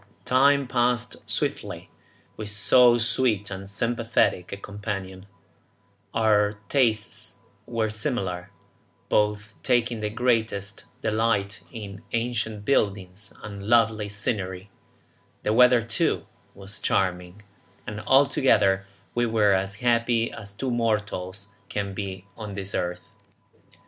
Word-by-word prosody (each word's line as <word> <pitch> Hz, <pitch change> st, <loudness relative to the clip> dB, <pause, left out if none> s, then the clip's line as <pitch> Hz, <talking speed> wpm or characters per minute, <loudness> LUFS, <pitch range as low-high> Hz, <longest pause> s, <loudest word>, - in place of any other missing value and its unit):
Time 140 Hz, +2 st, +4 dB
passed 120 Hz, -1 st, 0 dB
swiftly -, -, -3 dB, 0.4 s
with 110 Hz, -1 st, -4 dB
so 120 Hz, +3 st, +5 dB
sweet 115 Hz, -3 st, +1 dB
and 95 Hz, 0 st, -6 dB
sympathetic 115 Hz, -4 st, 0 dB
a 100 Hz, -, -4 dB
companion; 100 Hz, -2 st, -6 dB, 0.9 s
our 105 Hz, -2 st, +3 dB
tastes 110 Hz, -, 0 dB, 0.3 s
were 115 Hz, -2 st, -1 dB
similar, 100 Hz, -7 st, -2 dB, 0.6 s
both 105 Hz, 0 st, +1 dB
taking 120 Hz, -1 st, +1 dB
the 105 Hz, 0 st, -2 dB
greatest 110 Hz, -3 st, -1 dB, 0.2 s
delight 110 Hz, -2 st, 0 dB
in 105 Hz, -4 st, -8 dB
ancient 115 Hz, -3 st, -2 dB
buildings 100 Hz, -5 st, 0 dB
and 100 Hz, -1 st, -7 dB
lovely 110 Hz, -2 st, +3 dB
scenery; 100 Hz, -2 st, -3 dB, 0.7 s
the 105 Hz, -, +1 dB
weather, 125 Hz, 0 st, +6 dB
too, 115 Hz, -, 0 dB, 0.3 s
was 100 Hz, +1 st, -7 dB
charming, 90 Hz, +1 st, -1 dB, 0.4 s
and 105 Hz, -1 st, -5 dB
altogether 110 Hz, -8 st, +4 dB, 0.3 s
we 120 Hz, 0 st, +1 dB
were 110 Hz, -3 st, +3 dB
as 95 Hz, +1 st, -1 dB
happy 115 Hz, -1 st, +2 dB
as 100 Hz, -2 st, -9 dB
two 125 Hz, +6 st, -3 dB
mortals 105 Hz, -4 st, -1 dB, 0.2 s
can 100 Hz, -1 st, -3 dB
be 95 Hz, -1 st, -5 dB
on 105 Hz, -3 st, -7 dB
this 100 Hz, -1 st, -5 dB
earth. 90 Hz, 0 st, -2 dB
105 Hz, 110 wpm, -25 LUFS, 100-115 Hz, 0.9 s, weather